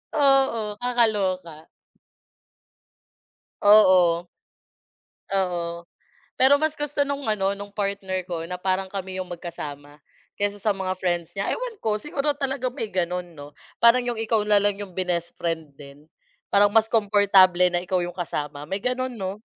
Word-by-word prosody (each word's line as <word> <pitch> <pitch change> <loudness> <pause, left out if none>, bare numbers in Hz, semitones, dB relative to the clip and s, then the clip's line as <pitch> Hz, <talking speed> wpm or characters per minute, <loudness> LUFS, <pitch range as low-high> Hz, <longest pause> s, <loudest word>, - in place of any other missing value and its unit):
Oo, 270 -7 +2
kakaloka. 195 -10 -1 1.9
Oo. 185 -5 +5 1.0
Oo. 175 -3 -2 0.5
Pero 270 +2 +6
mas 310 0 0
gusto 295 -1 -3
nung 280 0 -4
ano, 195 -2 +1
nung 200 0 -9
partner 200 -2 -2
ko 165 -2 -4
na 180 +2 -5
parang 190 0 -1
kami 190 -1 -5
yung 180 - -6
magkasama 150 -4 -8 0.4
kaysa 205 0 -2
sa 210 - +1
mga 185 -1 -2
friends 175 -2 -1
niya. 195 0 -3
Ewan 485 -4 -5
ko, 215 -1 0
siguro 290 +4 0
talaga 270 -2 -1
may 245 -3 -5
gano'n, 180 -1 -2
'no? 145 0 -12 0.2
Parang 235 +1 +5
yung 240 -2 -3
ikaw 220 -1 +1
na 210 -1 +4
lang 205 -1 +1
yung 200 -3 -7
binest 175 -2 -2
friend 160 -3 -3
din. 140 +1 -13 0.5
Parang 205 +1 +6
mas 220 0 +4
komportable 200 -4 +5
na 175 - +1
ikaw 180 0 -1
yung 175 - -5
kasama, 150 -4 -4
may 195 +1 -3
gano'n 255 0 -2
'no? 195 0 -5
195 Hz, 145 wpm, -24 LUFS, 175-225 Hz, 1.9 s, Pero